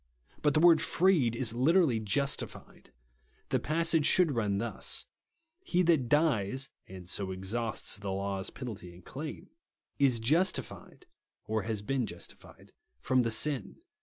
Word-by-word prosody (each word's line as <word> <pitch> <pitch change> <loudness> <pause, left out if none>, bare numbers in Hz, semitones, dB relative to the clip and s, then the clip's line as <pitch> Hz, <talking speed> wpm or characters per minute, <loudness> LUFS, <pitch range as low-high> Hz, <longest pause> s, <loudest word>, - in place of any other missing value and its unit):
But 150 -2 +2
the - - +4
word 165 -1 +6
"freed" 165 -11 +2
is 115 -2 -1
literally 140 0 +3
"justified." 125 +7 -2 0.6
The - - +1
passage 165 0 +1
should 180 -4 +4
run 105 -6 0
thus, 115 +3 -1 0.3
" 330 0 -51
He 180 - +1
that 160 -8 +2
dies 135 -5 +1 0.2
(and 90 -2 -11
so 95 +1 -3
exhausts 100 +3 -2
the 100 -1 -4
law's 95 0 -2
penalty 105 -9 -8
and 90 - -17
claim) 150 +3 -8 0.5
is 130 -4 +3
justified 165 - -1 0.4
(or 110 0 -1
has 110 0 -3
heen 130 +2 -1
justified) 85 -4 -11 0.3
from 130 - +2
the 115 - 0
sin." 125 0 0
125 Hz, 140 wpm, -30 LUFS, 105-155 Hz, 0.6 s, word